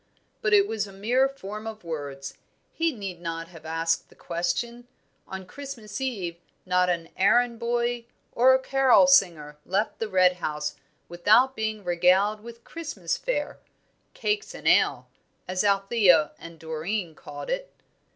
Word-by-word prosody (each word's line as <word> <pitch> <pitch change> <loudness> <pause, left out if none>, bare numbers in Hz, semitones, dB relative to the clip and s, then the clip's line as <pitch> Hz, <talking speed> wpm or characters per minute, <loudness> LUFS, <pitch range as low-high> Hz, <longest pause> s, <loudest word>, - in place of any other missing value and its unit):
But 420 - 0
it 400 0 +5
was 210 -2 -2
a - - -11
mere 240 +8 +2
form 215 -5 -8
of 220 -3 -7
words. 145 -4 -6 0.3
He 330 0 +1
need 195 - -7
not 165 -1 -5
have 165 -3 -12
asked 165 +1 -1
the - - -20
question. 235 +8 -3 0.4
On 190 0 -7
Christmas 240 -1 -8
Eve 195 -10 -3 0.3
not 180 0 +2
an 170 -2 -2
errand 235 +4 +3
boy 240 0 -1 0.3
or 260 +2 +5
a - - +2
carol 270 0 +5
singer 170 - +3
left 200 +4 -1
the 225 - -2
Red 185 -2 +4
House 150 -3 -3 0.3
without 215 +10 +4
being 220 -1 -3
regaled 185 +4 +3
with 235 +1 -11
Christmas 285 - -4
fare - - -3 0.6
"cakes 430 -3 -2
and - - -6
ale," - - +3 0.4
as 185 +1 0
Althea 195 -5 +4
and 165 0 -11
Doreen 165 +3 -3
called 145 -1 -8
it. - - -3
200 Hz, 150 wpm, -26 LUFS, 170-240 Hz, 0.6 s, it